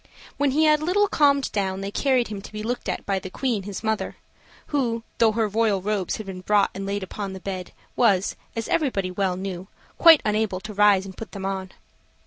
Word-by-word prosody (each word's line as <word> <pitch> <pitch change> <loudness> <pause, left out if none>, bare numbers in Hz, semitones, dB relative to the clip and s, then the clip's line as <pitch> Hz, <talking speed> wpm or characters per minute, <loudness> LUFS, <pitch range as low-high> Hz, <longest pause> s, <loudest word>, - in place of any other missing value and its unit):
When 285 -1 +2
he 300 +4 +2
had 305 -1 +5
a - - -6
little 405 +5 +3
calmed 280 -6 +3
down, 195 -2 -1
they 195 0 -4
carried 255 -1 +1
him 205 -2 -5
to - - -11
be 215 0 -6
looked 245 +2 -3
at - - -3
by 195 -1 0
the 185 - -8
Queen 240 0 -1
his 200 +1 -7
mother, 220 -1 -1 0.6
who, 235 -5 0 0.2
though 225 -2 +4
her 225 0 +1
royal 210 -1 +1
robes 200 -1 -1
had 215 - -7
been 190 -1 -7
brought 205 +1 +3
and 195 0 -5
laid 200 0 -2
upon 195 +1 -5
the 190 - -7
bed, 185 -1 -5 0.2
was, 195 -5 +3 0.2
as 230 -1 -3
everybody 225 - 0
well 185 -1 -1
knew, 185 -1 -5 0.3
quite 330 -3 +8
unable 210 -3 0
to 215 +1 -7
rise 205 -1 +4
and 190 -1 -10
put 225 - -8
them 195 -2 -5
on. 190 -1 -3
210 Hz, 220 wpm, -24 LUFS, 195-235 Hz, 0.6 s, quite